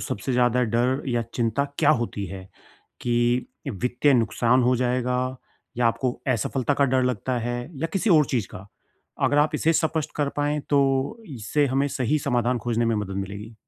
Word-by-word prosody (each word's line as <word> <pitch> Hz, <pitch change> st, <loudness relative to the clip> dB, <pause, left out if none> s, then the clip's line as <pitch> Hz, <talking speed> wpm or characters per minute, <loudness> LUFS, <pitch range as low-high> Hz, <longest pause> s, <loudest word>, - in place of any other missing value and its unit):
सबसे 105 Hz, +6 st, -3 dB
ज़्यादा 125 Hz, 0 st, +3 dB
डर 125 Hz, +3 st, +1 dB
या 120 Hz, -1 st, 0 dB
चिंता 120 Hz, +3 st, 0 dB
क्या 150 Hz, -, +5 dB
होती 105 Hz, -4 st, -3 dB
है 95 Hz, 0 st, -9 dB, 0.5 s
कि 120 Hz, -, +1 dB, 0.2 s
वित्तीय 125 Hz, +6 st, +1 dB
नुकसान 120 Hz, +2 st, +2 dB
हो 125 Hz, +1 st, +3 dB
जाएगा 125 Hz, 0 st, 0 dB, 0.6 s
या 120 Hz, -1 st, +2 dB
आपको 120 Hz, +2 st, 0 dB, 0.2 s
असफलता 130 Hz, +3 st, 0 dB
का 140 Hz, -, +3 dB
डर 130 Hz, -1 st, +2 dB
लगता 125 Hz, +1 st, -1 dB
है 120 Hz, +1 st, -2 dB, 0.2 s
या -, -, +2 dB
किसी 195 Hz, +2 st, +1 dB
और 155 Hz, -3 st, +6 dB
चीज़ 115 Hz, -6 st, 0 dB
का? 95 Hz, +2 st, -10 dB, 0.6 s
अगर 145 Hz, -, +3 dB
आप 150 Hz, +1 st, +2 dB
इसे 160 Hz, +2 st, +2 dB
स्पष्ट 160 Hz, -1 st, 0 dB
कर 145 Hz, -2 st, +1 dB
पाएँ 145 Hz, +1 st, 0 dB
तो 140 Hz, +7 st, +2 dB, 0.2 s
इससे 145 Hz, +7 st, 0 dB
हमें 135 Hz, +2 st, +1 dB
सही 135 Hz, +3 st, 0 dB
समाधान 125 Hz, -2 st, 0 dB
खोजने 120 Hz, +1 st, -1 dB
में 115 Hz, -, +1 dB
मदद 100 Hz, -2 st, -4 dB
मिलेगी। 100 Hz, +3 st, -6 dB
125 Hz, 175 wpm, -24 LUFS, 115-140 Hz, 0.6 s, और